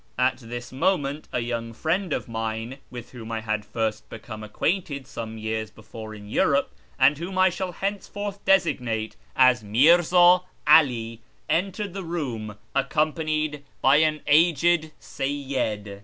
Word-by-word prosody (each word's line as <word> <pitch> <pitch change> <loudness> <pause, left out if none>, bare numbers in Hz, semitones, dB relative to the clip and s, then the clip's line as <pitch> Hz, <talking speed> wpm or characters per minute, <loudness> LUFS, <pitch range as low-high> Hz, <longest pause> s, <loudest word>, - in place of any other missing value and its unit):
At 130 +1 +2
this 120 0 -8
moment 145 0 0
a - - -1
young 115 -1 -4
friend 170 - -1
of - - -2
mine, 115 +3 -4
with 120 -2 -9
whom 115 -3 -9
I 110 -1 -2
had 110 -1 -2
first 110 0 -3
become 110 -1 -8
acquainted 140 - -2
some 110 -3 -7
years 110 0 -3
before 110 0 -10
in 105 -1 -11
Europe, - - +1 0.3
and 145 0 +4
whom 185 +3 -5
I 185 0 +5
shall 185 +1 -4
henceforth 205 +1 -4
designate 130 - +1 0.2
as 130 -3 +5
Mi'rza 175 - +5 0.2
'Ali, 115 -7 +4 0.3
entered 190 +4 -1
the 195 0 -5
room, 125 -11 -4 0.2
accompanied 155 0 0 0.2
by 135 +2 +5
an 155 -1 +2
aged 165 +1 +3
Seyyid. 130 -8 -3
135 Hz, 140 wpm, -25 LUFS, 115-165 Hz, 0.3 s, I